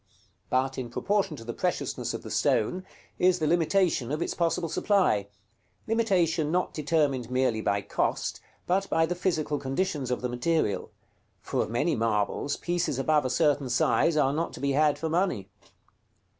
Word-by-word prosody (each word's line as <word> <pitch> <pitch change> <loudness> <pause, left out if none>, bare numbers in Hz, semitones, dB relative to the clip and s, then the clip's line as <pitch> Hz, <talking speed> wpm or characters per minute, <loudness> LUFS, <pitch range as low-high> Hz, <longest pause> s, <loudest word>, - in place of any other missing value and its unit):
But 130 +1 0
in 125 -2 -5
proportion 195 - 0
to 115 - -9
the 120 +1 -5
preciousness - - -2
of - - -7
the - - -8
stone, 180 +13 +1 0.4
is 180 0 +4
the 160 - -1
limitation 165 -4 +2
of 150 - -1
its - - -2
possible 170 0 0
supply; 165 - +2 0.6
limitation 180 -9 +1
not 180 +1 0
determined 145 -5 0
merely 125 -3 +1
by 100 -1 0
cost, 100 - -2 0.2
but 195 +2 0
by 165 0 +3
the 170 - -2
physical 155 -5 -1
conditions 140 0 -2
of 125 - -1
the 125 - -1
material, 120 - 0 0.5
for - - -2
of - - -2
many 145 +8 +1
marbles, 110 +5 0
pieces 175 -6 -1
above 150 +1 +2
a - - 0
certain 145 0 +2
size 120 +6 +2
are 140 -2 +3
not 165 +3 -2
to - - -9
be 140 0 0
had 150 +1 +3
for 165 - -3
money. 160 - 0
150 Hz, 170 wpm, -27 LUFS, 125-175 Hz, 0.6 s, is